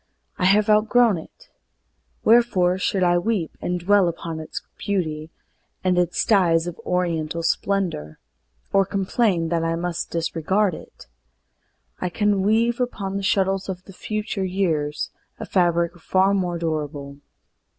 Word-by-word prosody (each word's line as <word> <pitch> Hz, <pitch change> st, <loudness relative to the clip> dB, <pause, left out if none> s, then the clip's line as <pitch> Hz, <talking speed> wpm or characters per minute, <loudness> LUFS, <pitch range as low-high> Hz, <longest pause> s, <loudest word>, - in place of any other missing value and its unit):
I -, -, +1 dB
have 205 Hz, +3 st, +4 dB
outgrown 215 Hz, -1 st, +4 dB
it. -, -, -16 dB, 0.7 s
Wherefore 195 Hz, -6 st, +4 dB
should 190 Hz, -1 st, 0 dB
I 175 Hz, 0 st, +3 dB
weep 195 Hz, -4 st, -2 dB
And 180 Hz, 0 st, -1 dB
dwell 195 Hz, +1 st, +4 dB
upon 165 Hz, -1 st, -4 dB
its 155 Hz, -, -6 dB, 0.2 s
beauty, 160 Hz, -6 st, -2 dB, 0.5 s
and 185 Hz, -1 st, +2 dB
its 175 Hz, -2 st, +1 dB
dyes 175 Hz, -6 st, +3 dB
Of 175 Hz, -2 st, -6 dB
oriental 170 Hz, -2 st, -1 dB
splendor, 165 Hz, -, -1 dB, 0.6 s
or 195 Hz, -, +5 dB
complain 190 Hz, -3 st, 0 dB
That 165 Hz, -1 st, 0 dB
I 165 Hz, 0 st, 0 dB
must 170 Hz, 0 st, -3 dB
needs 165 Hz, -1 st, -1 dB
discard 190 Hz, +5 st, +1 dB
it? -, -, -11 dB, 0.9 s
I 180 Hz, -, -2 dB
can 205 Hz, +1 st, +1 dB
weave 230 Hz, +4 st, +2 dB
Upon 200 Hz, -6 st, -3 dB
the 200 Hz, -, -1 dB
shuttles 195 Hz, 0 st, +1 dB
of 185 Hz, -1 st, -5 dB
the 195 Hz, -, -13 dB
future 215 Hz, 0 st, -3 dB
years 165 Hz, -6 st, -1 dB, 0.3 s
A -, -, -5 dB
fabric 170 Hz, -2 st, +1 dB
far 190 Hz, +3 st, +2 dB
more 180 Hz, -3 st, 0 dB
durable. 150 Hz, -4 st, -4 dB
180 Hz, 140 wpm, -23 LUFS, 165-200 Hz, 0.9 s, or